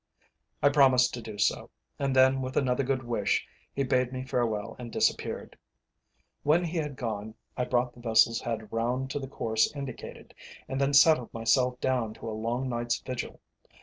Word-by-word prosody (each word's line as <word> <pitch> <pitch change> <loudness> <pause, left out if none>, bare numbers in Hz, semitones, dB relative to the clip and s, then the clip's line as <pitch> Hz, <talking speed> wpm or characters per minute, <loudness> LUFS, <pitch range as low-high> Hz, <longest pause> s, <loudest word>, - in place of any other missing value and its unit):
I 145 - +7
promised 130 -3 +5
to 120 - -5
do 110 -2 -8
so, 100 - 0 0.3
and 135 -1 0
then 130 0 +5
with 130 0 -4
another 130 -1 +2
good 130 0 -1
wish, 115 -4 0 0.3
he 140 - -1
bade 125 -1 +1
me 130 0 -4
farewell 115 -4 -1
and 120 -2 -7
disappeared. - - -1 0.9
When 160 +4 +3
he 170 0 -3
had 150 -3 -3
gone 110 -3 -4 0.2
I 125 - -1
brought 125 0 0
the - - -16
vessel's 115 0 +3
head 110 -2 -4
round 125 +4 -1
to 145 - -2
the 135 - -6
course 110 -4 0
indicated, 135 -4 -8 0.3
and 135 +1 -2
then 140 +1 +2
settled 140 -4 +5
myself 125 +2 +2
down 120 -4 0
to - - -9
a - - -3
long 115 +4 -2
night's 120 -1 -1
vigil. 130 -2 -6
125 Hz, 180 wpm, -28 LUFS, 115-135 Hz, 0.9 s, I